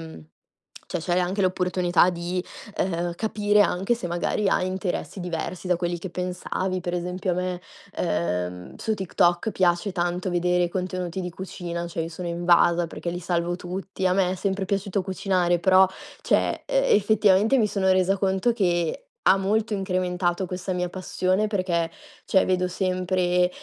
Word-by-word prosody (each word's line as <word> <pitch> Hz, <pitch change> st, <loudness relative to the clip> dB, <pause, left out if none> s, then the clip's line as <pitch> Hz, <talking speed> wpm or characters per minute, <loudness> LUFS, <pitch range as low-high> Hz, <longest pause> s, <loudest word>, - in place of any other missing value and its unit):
mhmm, 160 Hz, -, -10 dB, 0.7 s
cioè 180 Hz, -, -1 dB
c'hai 175 Hz, +2 st, +1 dB
anche 185 Hz, +3 st, -1 dB
l'opportunità 180 Hz, -1 st, +2 dB
di, 175 Hz, +1 st, -3 dB, 0.3 s
uhm, 175 Hz, -1 st, 0 dB
capire 210 Hz, 0 st, +1 dB
anche 195 Hz, +3 st, +2 dB
se 210 Hz, -7 st, -5 dB
magari 175 Hz, +4 st, 0 dB
hai 185 Hz, -, +2 dB
interessi 185 Hz, 0 st, -3 dB
diversi 175 Hz, +1 st, -4 dB
da 180 Hz, -, +3 dB
quelli 175 Hz, 0 st, -2 dB
che 185 Hz, 0 st, -7 dB
pensavi. 185 Hz, +1 st, -3 dB
Per 175 Hz, 0 st, -3 dB
esempio 180 Hz, +2 st, -2 dB
a 175 Hz, -, +1 dB
me, 180 Hz, 0 st, -2 dB, 0.4 s
uhm, 90 Hz, +1 st, -2 dB
su 220 Hz, -, -1 dB
TikTok 180 Hz, 0 st, +1 dB
piace 180 Hz, +1 st, +1 dB
tanto 175 Hz, +1 st, -1 dB
vedere 180 Hz, 0 st, +2 dB
i 175 Hz, -, -1 dB
contenuti 185 Hz, 0 st, -3 dB
di 180 Hz, -, -4 dB
cucina, 175 Hz, -1 st, -5 dB
cioè 165 Hz, -1 st, -3 dB
io 165 Hz, -, -4 dB
sono 175 Hz, +2 st, -6 dB
invasa, 170 Hz, 0 st, +3 dB
perché 170 Hz, -, -5 dB
li 175 Hz, +1 st, -4 dB
salvo 175 Hz, 0 st, -1 dB
tutti. 185 Hz, +2 st, -5 dB
A 180 Hz, -, +3 dB
me 185 Hz, -1 st, +2 dB
è -, -, -2 dB
sempre 195 Hz, +1 st, -1 dB
piaciuto 195 Hz, 0 st, -1 dB
cucinare, 180 Hz, -2 st, +1 dB
però, 190 Hz, 0 st, +6 dB, 0.4 s
cioè -, -, +1 dB
uhm, -, -, 0 dB
effettivamente 210 Hz, -, +4 dB
mi 215 Hz, -4 st, +3 dB
sono 190 Hz, -2 st, +1 dB
resa 185 Hz, +1 st, +2 dB
conto 190 Hz, +4 st, +1 dB
che, 175 Hz, -, 0 dB, 0.2 s
ha -, -, +6 dB
molto 210 Hz, +3 st, 0 dB
incrementato 185 Hz, -1 st, -1 dB
questa 180 Hz, +1 st, -4 dB
mia 180 Hz, -1 st, -1 dB
passione, 185 Hz, +2 st, 0 dB
perché, 180 Hz, -5 st, 0 dB, 0.3 s
cioè, 190 Hz, -, +3 dB
vedo 185 Hz, -1 st, +1 dB
sempre, 180 Hz, -1 st, +1 dB
180 Hz, 165 wpm, -25 LUFS, 175-190 Hz, 0.7 s, però